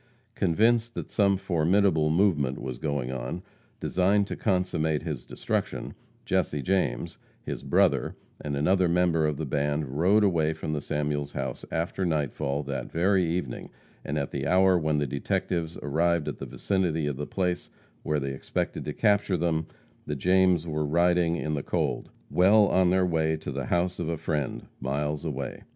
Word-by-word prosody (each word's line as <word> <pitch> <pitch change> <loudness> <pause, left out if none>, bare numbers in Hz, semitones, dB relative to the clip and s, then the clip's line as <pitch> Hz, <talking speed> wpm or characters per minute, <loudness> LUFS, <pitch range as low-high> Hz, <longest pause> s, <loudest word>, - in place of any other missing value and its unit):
Convinced 115 +6 +2
that - - -5
some 100 -2 +3
formidable 85 -2 +2
movement 80 -6 +2
was 65 -2 -5
going 70 -4 -2
on, 65 +8 -4 0.4
designed 100 +2 +2
to - - -5
consummate 85 -6 0
his 75 -8 -4
destruction, - - -3 0.3
Jesse 75 -2 0
James, 95 +3 -1 0.2
his - - -5
brother, - - +2 0.3
and 70 -1 -2
another 90 +5 +3
member 85 -2 +2
of 75 -2 -2
the 80 - -3
band 75 0 -1
rode 100 +5 +4
away 80 -5 +2
from 75 - -4
the 75 - -2
Samuels 75 0 -2
house - - -4
after 85 +3 -2
nightfall 75 -3 -1
that 70 -1 -5
very 95 +3 +3
evening, 80 -7 -3 0.3
and 75 - -3
at 70 -1 -2
the 70 0 -2
hour 95 +2 +5
when 80 -3 +1
the 75 - +1
detectives 80 +4 -2
arrived 85 +2 +1
in - - -1
the - - -6
vicinity 90 -6 -1
of 75 -2 -2
the 75 - -4
place 90 -2 -2 0.3
where 75 -1 0
they 70 -1 -3
expected 65 - -3
to 75 - -3
capture 105 -2 +2
them, 80 -1 0 0.4
the 75 - -2
Jameses 90 +2 +3
were 75 -1 -1
riding 85 +2 +2
in 75 -2 -2
the 70 - -1
cold, - - -2 0.2
well 100 +4 +6
on 95 -1 +3
their 95 0 +3
way 80 -2 +1
to 75 -2 -6
the 70 -1 -3
house 90 +3 0
of - - -2
a 85 - -1
friend, 75 -3 -2 0.2
miles 75 +3 -2
away. 70 -4 -4
80 Hz, 170 wpm, -27 LUFS, 75-90 Hz, 0.4 s, well